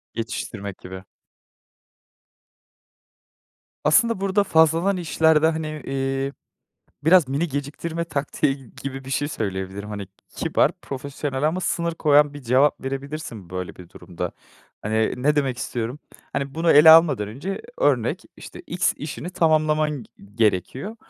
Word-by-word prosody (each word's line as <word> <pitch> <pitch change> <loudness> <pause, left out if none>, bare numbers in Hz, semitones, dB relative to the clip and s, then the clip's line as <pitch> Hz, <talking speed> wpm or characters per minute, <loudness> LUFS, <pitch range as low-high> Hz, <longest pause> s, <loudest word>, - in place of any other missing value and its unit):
Yetiştirmek 110 -3 -5
gibi. 95 +1 -9 2.8
Aslında 230 +7 +3
burada 195 +1 +2
fazladan 165 +3 +3
işlerde, 160 -1 +3
hani, 160 -1 -1 0.2
eee, 135 0 -2 0.7
biraz 170 -3 +6
mini 145 +6 -1
geciktirme 150 +4 -4
taktiği 140 -2 -1
g 130 -4 -16
gibi 135 -1 -5
bir 135 - -8
şey 145 +1 0
söyleyebilirim. 100 -4 -4
Hani, 100 -2 -5 0.3
kibar, - - +2
profesyonel 140 0 -4
ama 180 +3 -2
sınır 170 -1 -1
koyan 150 -2 +4
bir 145 - -9
cevap 130 +4 +3
verebilirsin 135 - -6
böyle 90 0 -5
bir 90 -2 -12
durumda. 85 0 -6 0.5
Hani, 110 +1 +1
ne 150 +4 +1
demek 135 -4 0
istiyorum, 120 +4 -4 0.3
hani, 140 0 -3
bunu 165 +1 +2
ele 150 +2 +9
almadan 160 -11 +6
önce 145 - -5 0.2
örnek, - - +1
işte, - - -10
x 180 +2 +1
işini 155 +3 -6
tamamlaman 155 -4 +1
g - - -17 0.3
gerekiyor. 115 - 0
145 Hz, 130 wpm, -23 LUFS, 125-160 Hz, 2.8 s, ele